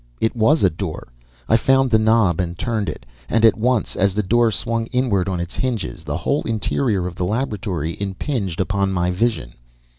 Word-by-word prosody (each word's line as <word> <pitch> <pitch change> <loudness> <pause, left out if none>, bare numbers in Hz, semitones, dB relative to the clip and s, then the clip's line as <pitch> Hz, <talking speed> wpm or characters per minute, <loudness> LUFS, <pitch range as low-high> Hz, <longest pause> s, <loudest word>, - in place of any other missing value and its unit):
It 110 - 0
WAS 120 +6 +3
a 95 - +6
door. 80 -6 -6 0.4
I 110 - +4
found 135 +2 +3
the 110 - +5
knob 110 -6 +3
and 85 -1 -2
turned 110 -6 -1
it. 75 - -8 0.2
And 115 0 +3
at 110 - +6
once, 120 0 0
as 100 0 +1
the 105 - +1
door 115 +4 +3
swung 115 +1 -2
inward 110 -8 0
on 90 -2 -2
its 85 0 -5
hinges, 115 -9 -3
the 75 0 -3
whole 140 +11 0
interior 110 -2 -1
of 90 - -4
the 90 - -3
laboratory 100 - -2
impinged 100 - -3
upon 100 0 0
my 90 0 0
vision. 90 - -1
105 Hz, 190 wpm, -21 LUFS, 90-115 Hz, 0.4 s, a